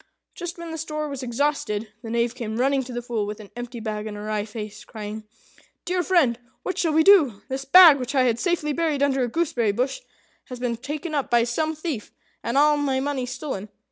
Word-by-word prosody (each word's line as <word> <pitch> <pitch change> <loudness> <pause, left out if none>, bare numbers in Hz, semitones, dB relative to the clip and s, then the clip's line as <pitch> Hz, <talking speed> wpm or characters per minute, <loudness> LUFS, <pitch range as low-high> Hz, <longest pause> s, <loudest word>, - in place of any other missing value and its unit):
Just 350 0 -6
when 340 -1 -7
the 320 - -5
store 305 -1 -3
was 275 -2 -5
exhausted, 235 -4 -1
the 230 - -7
Knave 235 +1 0
came 225 -3 -5
running 270 +2 +2
to 255 - -8
the 240 0 -4
Fool 230 -4 -2
with 210 +1 -5
an 205 -2 -12
empty 240 0 -6
bag 215 -1 -4
and 210 -1 -6
a - - -7
wry 210 -1 -2
face, 210 -1 -7
crying, 215 -1 -7 0.6
"Dear 360 0 0
friend, 315 -10 +3 0.2
what 375 0 -3
shall 330 - +2
we 320 +1 +5
do? 310 - +5
This 265 +1 -3
bag, 325 -1 +9
which 255 +3 -4
I 260 - +5
had 240 -2 +1
safely 335 -5 0
buried 310 -3 0
under 270 -2 +2
a - - +1
gooseberry 240 -7 0
bush, 255 - -1 0.5
has 250 - -8
been 240 -2 -1
taken 295 +6 -5
up 285 -3 -1
by 240 -1 +4
some 310 +7 -1
thief, 310 -8 -5 0.3
and 235 +3 -1
all 295 +1 +5
my 275 -2 0
money 270 -2 -2
stolen. 255 -6 -5
260 Hz, 220 wpm, -24 LUFS, 230-305 Hz, 0.6 s, bag